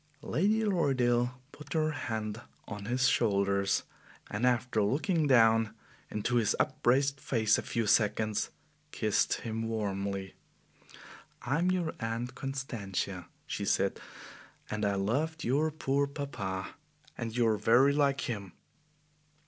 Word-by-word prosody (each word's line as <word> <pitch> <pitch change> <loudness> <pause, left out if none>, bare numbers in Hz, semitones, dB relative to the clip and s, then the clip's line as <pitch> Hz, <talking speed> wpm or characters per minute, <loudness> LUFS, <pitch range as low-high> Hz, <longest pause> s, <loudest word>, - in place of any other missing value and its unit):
Lady 210 +9 +1
Lorridaile 125 - +2 0.2
put 150 - -9
her 155 -1 +1
hand 110 -5 -4 0.3
on 105 -1 -6
his 125 +3 +2
shoulders, 100 -4 +2 0.5
and 105 +4 +1
after 125 -2 +1
looking 150 - +1
down 115 -3 +4 0.3
into 115 +3 0
his 110 -3 +2
upraised 135 +3 +2
face 110 -5 +2
a - - -2
few 115 -1 -2
seconds, 105 0 +2 0.4
kissed - - +1
him 115 0 -3
warmly. 100 -3 -3 1.1
"I 135 +5 0
am 180 +2 +2
your 180 -3 0
Aunt 115 +2 -3
Constantia," 105 -10 -4 0.2
she - - -4
said, - - +1 0.7
"and 105 -1 -1
I 100 -1 +1
loved 145 +11 -1
your 145 +6 +2
poor 140 -2 0
papa, 105 -10 -4 0.4
and 115 -1 -4
you 120 - +3
are 110 - +2
very 120 +7 +5
like 140 -1 +2
him." 100 -5 -4
120 Hz, 125 wpm, -31 LUFS, 105-140 Hz, 1.1 s, very